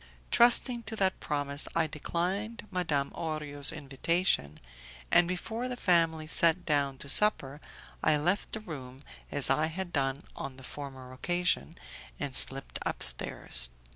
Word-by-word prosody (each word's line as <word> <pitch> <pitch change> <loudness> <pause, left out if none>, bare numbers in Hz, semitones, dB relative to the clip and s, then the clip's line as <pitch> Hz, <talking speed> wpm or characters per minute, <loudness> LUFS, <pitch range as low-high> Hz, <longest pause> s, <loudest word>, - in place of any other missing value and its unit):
Trusting 240 0 +4
to 220 - -5
that 190 -3 0
promise 145 -1 -2
I 165 -1 +2
declined 185 +9 -3
Madam 160 -7 -1
Orio's 150 -4 -2
invitation, 150 - -1 0.5
and 175 - +5
before 220 +7 -4
the 250 - -4
family 165 -6 +2
sat 170 +2 +3
down 140 -3 0
to 140 - -7
supper 145 -5 +4 0.4
I 155 -1 +3
left 175 +7 -1
the 220 - -4
room 135 -8 -9 0.3
as 145 -2 +3
I 155 +1 +2
had 175 +2 -6
done 135 -2 -1
on 135 -1 -7
the 130 - -13
former 130 -2 -9
occasion, 175 +3 -1 0.4
and 140 -2 -4
slipped 135 0 +5
upstairs. - - +1
155 Hz, 140 wpm, -29 LUFS, 140-180 Hz, 0.5 s, and